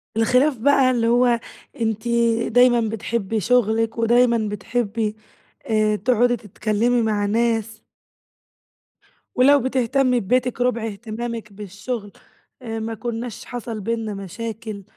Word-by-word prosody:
الخلاف 250 +5 +3
بقى 265 +2 +4
اللي 235 -2 +1
هو، 240 0 +3 0.4
أنتِ 220 0 -1 0.4
دايمًا 245 +1 +5
بتحبي 225 0 -2
شغلِك 225 +1 +1
ودايمًا 235 +1 +3
بتحبي، 215 +1 -2 0.5
آآ، 215 -1 +2
تقعدي 245 +3 +2
تتكلّمي 225 +3 0
مع 210 -2 0
ناس. 225 0 0 1.5
ولو 280 +3 +5
بتهتمي 255 0 +1
ببيتِك 250 +3 0
ربع 245 -2 0
اهتمامِك 225 0 -6
بالشغل، 205 +2 -6 0.5
آآ 225 -2 -5
ما 225 +1 -4
كناش 230 0 -5
حصل 230 -3 -6
بيننا 225 0 -3
مشاكل، 210 +2 -6
230 Hz, 110 wpm, -22 LUFS, 215-245 Hz, 1.5 s, دايمًا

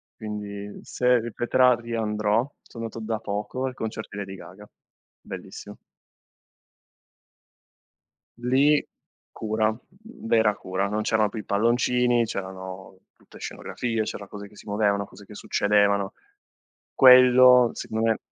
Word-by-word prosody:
Quindi 105 -1 -7
se 125 -1 +2
ripeterà 120 +2 +2
riandrò, 110 0 -1
so - - -17
andato 115 0 -6
da 110 0 -3
poco 105 +5 -4
al 130 - -3
concerto 110 -2 -6
di 100 - -8
Lady 95 -1 -6
Gaga. 105 +3 -13 0.5
Bellissimo. - - -9 2.6
Lì 135 +5 +3 0.5
cura, 110 0 -1 0.5
vera 110 -2 +3
cura, 95 +2 -2
non 105 +1 -2
c'erano 110 -1 +1
più 110 - -6
i - - -7
palloncini, 120 +2 +2
c'erano 95 -2 -7 0.2
tutte - - -18
scenografie, 115 -3 -3
c'era 100 -2 -6
cose 100 0 -9
che 105 - -20
si - - -15
muovevano, 100 -1 +1
cose 100 +2 -15
che 105 - -13
succedevano. 100 -1 +1 0.8
Quello 125 -1 +7
secondo 110 +1 -2
me 110 - +1
110 Hz, 120 wpm, -25 LUFS, 100-120 Hz, 2.6 s, Quello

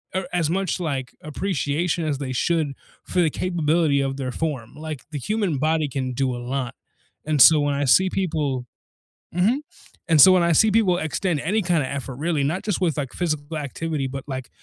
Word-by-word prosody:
or 190 - -1
as 165 -3 +1
much, 190 0 -1
like, 140 -7 -3
appreciation 160 0 -1
as 145 -3 -1
they 135 -2 -4
should 155 +2 0 0.3
for 180 - -2
the 165 -3 +4
capability 160 -4 +1
of 135 0 -2
their 130 -2 -3
form, 140 -6 -4
like 155 -4 -7
the 145 - -4
human 200 - -1
body 155 +1 +1
can 130 -1 -3
do 130 0 0
a - - -6
lot, 125 0 -3 0.5
and 155 -2 0
so 155 -2 +8
when 145 -1 0
I 140 0 0
see 185 +9 +5
people 150 -10 -1 0.7
Mhm, 220 - +2 0.5
and 160 -3 +4
so 185 - +10
when 185 -1 +5
I 170 -1 +3
see 220 +6 +5
people 195 -5 +3
extend 160 0 -1
any 205 +8 0
kinda 170 -6 +1
effort 135 -2 -5
really, 155 +1 -1
not 155 +7 -1
just 205 -3 -2
with, 165 -5 +1
like, 135 -4 -3
physical 155 -2 -2
activity, 145 0 -3
but 135 0 -6
like, 130 -2 -5
155 Hz, 195 wpm, -23 LUFS, 140-175 Hz, 0.7 s, so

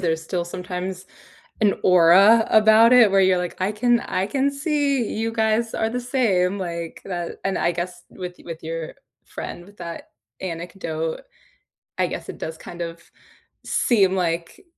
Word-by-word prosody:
there's 160 -2 0
still 175 +1 -3
sometimes 180 +1 -6 0.5
an 210 -2 +3
aura 190 +5 +6
about 220 +2 +6
it 240 -4 +7
where 195 - +5
you're, 185 -1 +4
like, 180 -1 -4
"I 185 +2 +1
can 240 +2 +2
I 190 -4 -2
can 275 +5 0
see 280 -3 0
you 225 +1 -1
guys 225 0 +1
are 220 - 0
the 245 +2 -3
same," 205 -7 +1
like, 170 -3 -5
that, 175 -3 -5
and 195 - 0
I 170 - +1
guess 175 +1 -5
with 180 -1 -7
with 165 -2 -8
your 165 0 -5 0.3
friend 175 - -8
with 205 +2 -18
that 170 -1 -8 0.3
anecdote, 165 -2 -4 0.8
I - - +2
guess - - -6
it - - -7
does 160 0 -6
kind 175 0 -9
of 165 0 -7 0.6
seem, 195 -6 +2
like, 170 - -2
185 Hz, 160 wpm, -22 LUFS, 170-220 Hz, 0.8 s, it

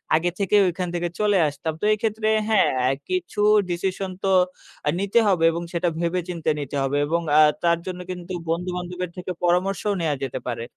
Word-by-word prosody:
আগে 170 +3 +2
থেকে 200 +1 +1
ওখান 180 +1 -3
থেকে 175 0 -1
চলে 205 -2 +3
আসতাম। 145 +2 -4
তো - - 0
এক্ষেত্রে 215 0 -1 0.2
হ্যাঁ, 215 -3 +4
অ্যা 125 +1 +2 0.2
কিছু 365 - -3 0.3
ডিসিশন 185 +2 -2
তো - - +1 0.6
আ - - +4
নিতে 200 +4 +2
হবে 185 -5 +2
এবং 170 +1 -4
সেটা 175 +1 0
ভেবে 170 +1 0
চিন্তে 165 -3 -2
নিতে 145 0 -5
হবে 135 +1 0
এবং 170 +3 0 0.2
আ - - +8 0.2
তার 170 0 +3
জন্য 180 -1 -5
কিন্তু 180 0 -7 0.2
বন্ধু-বান্ধবের 180 +1 -3
থেকে 180 0 -5
পরামর্শও 185 +4 +1
নেয়া 155 -3 0
যেতে 130 - -5
পারে। 115 -1 -3
180 Hz, 185 wpm, -23 LUFS, 165-195 Hz, 0.6 s, আ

